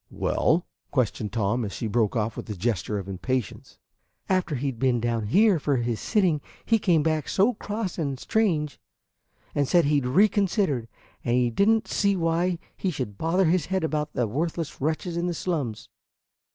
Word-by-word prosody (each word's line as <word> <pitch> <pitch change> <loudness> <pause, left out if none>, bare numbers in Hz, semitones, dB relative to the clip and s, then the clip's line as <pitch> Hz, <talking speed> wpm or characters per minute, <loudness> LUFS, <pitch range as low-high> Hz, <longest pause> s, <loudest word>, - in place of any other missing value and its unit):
"Well?" 170 +2 +1 0.2
questioned 110 -5 -1
Tom, 110 +2 0
as 100 - -4
she - - -4
broke 110 +1 +1
off 110 -1 -1
with - - -7
a 105 - -3
gesture 105 +1 -1
of 100 -1 -5
impatience. 105 +3 -3 0.5
"And 190 - +3
after 175 -5 -2
he 135 +2 -1
'd 115 - -13
been 130 -2 +2
down 115 -2 -1
here 200 - +4
for 140 -2 +1
his 120 -2 -1
sitting, 185 -9 +1 0.2
he 225 -1 +3
came 170 -7 +3
back 155 -2 0
so 205 +6 +3
cross 205 -3 -4
and 140 -5 -2
strange; 170 -10 0 0.7
and 145 -2 +1
said 175 +1 +4
he'd 145 -3 +2
reconsidered, 190 - +2 0.4
and 120 - +1
he 125 -1 +2
did 200 - +3
n't 225 -1 +2
see 200 -1 +1
why 170 +1 +1 0.2
he 190 - -1
should 125 - -5
bother 180 +4 +2
his 170 -1 +2
head 190 -1 -1
about 150 -1 -1
the 120 - +1
worthless 160 +7 -3
wretches 160 +4 -1
in 170 +1 0
the 175 - -2
slums. 145 - -3
150 Hz, 185 wpm, -26 LUFS, 120-180 Hz, 0.7 s, here